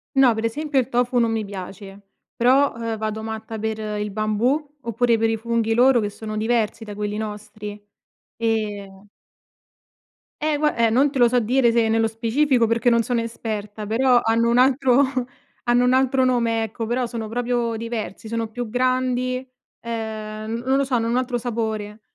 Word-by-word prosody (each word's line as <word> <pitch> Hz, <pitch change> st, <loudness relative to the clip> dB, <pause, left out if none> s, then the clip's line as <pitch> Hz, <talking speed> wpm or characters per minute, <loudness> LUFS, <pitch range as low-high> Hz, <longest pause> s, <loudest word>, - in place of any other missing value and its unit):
No, 265 Hz, -3 st, +6 dB
per 220 Hz, -, -3 dB
esempio 290 Hz, +5 st, -2 dB
il 260 Hz, -1 st, +2 dB
tofu 245 Hz, 0 st, +1 dB
non 230 Hz, -1 st, +2 dB
mi 220 Hz, -1 st, -1 dB
piace, 195 Hz, 0 st, -8 dB, 0.4 s
però, 265 Hz, +3 st, +3 dB
ehm, 230 Hz, -1 st, -3 dB
vado 215 Hz, 0 st, -3 dB
matta 220 Hz, 0 st, -5 dB
per 220 Hz, 0 st, -3 dB
il 210 Hz, -1 st, -3 dB
bambù 240 Hz, +9 st, -1 dB
oppure 235 Hz, 0 st, +1 dB
per 225 Hz, 0 st, +1 dB
i 225 Hz, -, 0 dB
funghi 230 Hz, 0 st, 0 dB
loro 245 Hz, +1 st, +5 dB
che 205 Hz, -, -1 dB
sono 215 Hz, +1 st, -7 dB
diversi 225 Hz, 0 st, 0 dB
da 210 Hz, -2 st, -8 dB
quelli 210 Hz, 0 st, -3 dB
nostri, 210 Hz, -1 st, -6 dB, 0.6 s
ehm 210 Hz, -3 st, -3 dB, 1.4 s
Eh 305 Hz, -1 st, +1 dB
gua 300 Hz, 0 st, +1 dB
eh, 230 Hz, -1 st, +3 dB
non 265 Hz, +5 st, +3 dB
te 275 Hz, -, -3 dB
lo 240 Hz, -, +7 dB
so 245 Hz, +1 st, +2 dB
dire 240 Hz, +1 st, +3 dB
se 230 Hz, -1 st, +2 dB
nello 225 Hz, 0 st, +2 dB
specifico 235 Hz, +3 st, +1 dB
perché 230 Hz, +2 st, +2 dB
non 235 Hz, -1 st, +3 dB
sono 240 Hz, 0 st, 0 dB
esperta, 215 Hz, -2 st, -5 dB
però 245 Hz, +3 st, +3 dB
hanno 230 Hz, +1 st, +2 dB
un 235 Hz, -, +3 dB
altro 260 Hz, +1 st, +4 dB, 0.6 s
hanno 240 Hz, 0 st, +3 dB
un 250 Hz, -, +3 dB
altro 260 Hz, 0 st, +3 dB
nome 230 Hz, -3 st, +1 dB
ecco, 225 Hz, +1 st, -4 dB
però 245 Hz, +2 st, 0 dB
sono 230 Hz, -2 st, -5 dB
proprio 240 Hz, 0 st, -1 dB
diversi 225 Hz, -2 st, -5 dB
sono 230 Hz, 0 st, -2 dB
più 240 Hz, +2 st, -5 dB
grandi, 255 Hz, +1 st, 0 dB, 0.3 s
ehm, 220 Hz, -1 st, -5 dB
n 230 Hz, +1 st, -3 dB
non 265 Hz, +1 st, +2 dB
lo 275 Hz, -, +2 dB
so, 265 Hz, -2 st, -1 dB
hanno 230 Hz, -1 st, +1 dB
un 240 Hz, -, +1 dB
altro 255 Hz, -1 st, 0 dB
sapore. 220 Hz, -3 st, -3 dB
230 Hz, 180 wpm, -22 LUFS, 220-250 Hz, 1.4 s, lo